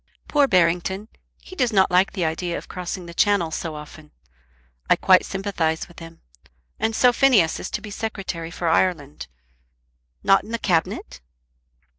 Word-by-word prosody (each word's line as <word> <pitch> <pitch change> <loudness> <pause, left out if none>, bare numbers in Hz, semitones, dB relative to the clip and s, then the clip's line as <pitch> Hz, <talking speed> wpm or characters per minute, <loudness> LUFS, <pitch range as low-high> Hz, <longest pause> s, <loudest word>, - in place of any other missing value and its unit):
"Poor 290 -2 +3
Barrington! 185 +2 +1 0.3
He 370 - -12
does 250 -7 +1
not 190 -3 +3
like 180 +2 +3
the 185 -5 -1
idea 170 +2 -2
of - - -9
crossing 180 0 -6
the 170 - -10
Channel 190 -3 +2
so 160 -1 -4
often. 150 0 -11 0.8
I - - +6
quite 185 -1 +5
sympathise 185 -5 -2
with 175 - -15
him. 165 0 -12 0.6
And 220 0 0
so 250 +1 +4
Phineas 230 - +3
is - - -5
to 210 - -4
be 210 -1 -9
Secretary 195 -6 -5
for 170 0 -4
Ireland! 160 -4 0 1.0
Not 195 0 +4
in - - -13
the 230 - -2
Cabinet?" 165 - -1
180 Hz, 160 wpm, -23 LUFS, 165-205 Hz, 1.0 s, I